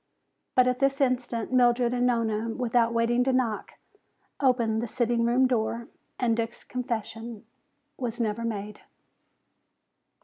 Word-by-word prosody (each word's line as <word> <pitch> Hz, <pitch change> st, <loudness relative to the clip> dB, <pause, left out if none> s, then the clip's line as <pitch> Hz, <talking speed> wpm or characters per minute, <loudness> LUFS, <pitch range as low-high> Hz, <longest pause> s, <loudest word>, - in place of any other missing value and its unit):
But 255 Hz, 0 st, +5 dB
at 250 Hz, 0 st, +1 dB
this 275 Hz, +1 st, +2 dB
instant 250 Hz, -3 st, 0 dB
Mildred 245 Hz, -1 st, +4 dB
and 245 Hz, 0 st, +2 dB
Nona, 230 Hz, -2 st, 0 dB
without 235 Hz, -1 st, +1 dB
waiting 235 Hz, +1 st, +2 dB
to 265 Hz, -, +2 dB
knock, 245 Hz, -5 st, -1 dB, 0.7 s
opened 235 Hz, -5 st, +2 dB
the 240 Hz, -, -3 dB
sitting 235 Hz, 0 st, +1 dB
room 245 Hz, +3 st, +4 dB
door 235 Hz, -1 st, -1 dB, 0.3 s
and 235 Hz, -3 st, +1 dB
Dick's 230 Hz, 0 st, -4 dB
confession 230 Hz, -2 st, -5 dB, 0.5 s
was 240 Hz, -2 st, -4 dB
never 225 Hz, 0 st, -1 dB
made. 210 Hz, -2 st, -4 dB
235 Hz, 130 wpm, -27 LUFS, 230-250 Hz, 0.7 s, But